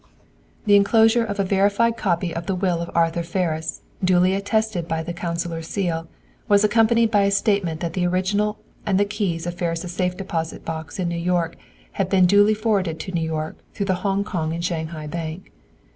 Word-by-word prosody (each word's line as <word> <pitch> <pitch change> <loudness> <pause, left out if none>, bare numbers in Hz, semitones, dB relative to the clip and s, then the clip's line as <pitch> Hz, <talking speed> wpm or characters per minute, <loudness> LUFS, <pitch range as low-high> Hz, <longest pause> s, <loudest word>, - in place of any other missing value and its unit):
The 205 -1 +6
enclosure 225 +3 +5
of 205 -2 -4
a - - +3
verified 200 +4 +2
copy 175 -5 -1
of 165 0 -5
the 190 - 0
will 180 -2 0
of 170 - -4
Arthur 170 0 +2
Ferris, 165 -2 -2 0.2
duly 185 0 +4
attested 200 -3 0
by 160 -1 -2
the 170 +1 -5
consular 170 -1 -3
seal, 165 -1 -2 0.4
was 205 0 +5
accompanied 225 +1 +4
by 205 -2 +4
a - - +3
statement 195 -5 +1
that 170 -1 -2
the 180 -1 +1
original 200 +4 0 0.3
and 195 -2 +1
the 205 - +4
keys 200 -5 -2
of 175 - -3
Ferris' 175 0 -3
safe 180 0 -1
deposit 165 -4 -4
box 160 -2 -5
in 185 -2 -1
New 170 0 -2
York 175 -1 0 0.4
had 195 -2 -1
been 190 -2 +5
duly 205 +3 +5
forwarded 200 -7 0
to 185 - -6
New 170 -2 -1
York, 160 -1 -3 0.2
through 200 - -1
the 185 -2 -1
Hong 200 0 +1
Kong 165 -6 -2
and 170 +1 -3
Shanghai 160 -2 -3
Bank. 160 +2 -6
180 Hz, 190 wpm, -22 LUFS, 170-200 Hz, 0.4 s, The